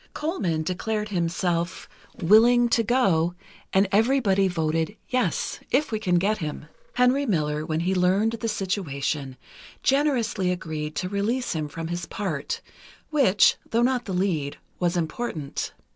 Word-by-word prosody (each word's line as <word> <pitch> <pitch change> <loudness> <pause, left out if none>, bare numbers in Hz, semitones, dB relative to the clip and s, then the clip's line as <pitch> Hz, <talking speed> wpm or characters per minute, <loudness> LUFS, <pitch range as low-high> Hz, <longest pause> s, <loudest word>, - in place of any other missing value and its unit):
Colman 190 - -1
declared 210 +5 -2
himself 175 -1 -1 0.3
willing 230 +6 +5
to 230 - +3
go, 190 -8 +2 0.4
and 195 +1 +3
everybody 210 -3 +3
voted 165 +2 -1
"Yes—if 255 +2 0
we 220 - -1
can 180 -4 +1
get 205 +5 +2
him." 150 -3 -5 0.3
Henry 255 +3 +3
Miller, 150 -5 0
when 155 0 -1
he 185 +2 +1
learned 190 +4 +2
the 230 0 -3
situation, 155 -10 -2 0.5
generously 260 -9 +1
agreed 155 -4 -4
to 180 - -2
release 210 +6 -1
him 155 -2 -2
from 165 +2 -6
his 175 0 -4
part, 170 -9 -3 0.5
which, 260 -10 +4
though 230 +1 +2
not 250 -1 +1
the 195 - -4
lead, 175 -7 -1 0.2
was 175 0 +1
important. 160 -3 -3
190 Hz, 135 wpm, -25 LUFS, 165-230 Hz, 0.5 s, willing